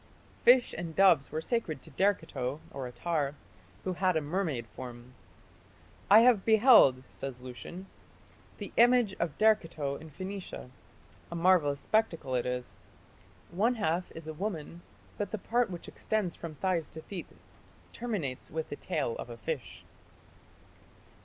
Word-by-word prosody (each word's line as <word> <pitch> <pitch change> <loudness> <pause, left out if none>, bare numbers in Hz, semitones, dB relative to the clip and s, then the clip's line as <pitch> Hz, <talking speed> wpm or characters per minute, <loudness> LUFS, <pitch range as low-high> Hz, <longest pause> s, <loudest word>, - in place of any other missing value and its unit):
Fish 245 0 +6
and 170 -2 -5
doves 180 -8 +5
were 155 +1 -2
sacred 165 - -1
to 160 - -13
Derceto 150 -6 0
(Attar), 140 +3 -2 0.5
who 185 - -1
had 185 -1 +1
a - - +3
mermaid 150 -5 -2
form. 125 0 -9 1.0
"I 210 +3 +9
have 235 -5 +5
beheld", 220 - +6
says 130 -2 -7
Lucian, 130 +9 -8 0.7
"the - - -7
image 240 -3 +5
of 170 -3 -2
Derceto 165 -10 +2
in 160 - -10
Phoenicia. 185 -4 -7 0.6
A - - -4
marvellous 165 -5 +3
spectacle 170 -11 0
it 125 0 0
is. 125 0 -4 0.7
One 220 +8 +2
half 175 -4 -1
is 165 -1 -8
a 155 - -4
woman, 170 -2 -5 0.4
but 205 - -1
the 220 - -3
part 235 +3 +1
which 175 -2 -7
extends 210 -6 -2
from 165 -2 -7
thighs 175 -1 0
to 160 - -10
feet 190 -4 -7 0.7
terminates 195 - -4
with 160 0 -4
the - - -4
tail 150 -10 -2
of - - -6
a 120 - -8
fish." 115 - -5
165 Hz, 140 wpm, -30 LUFS, 140-200 Hz, 1.0 s, I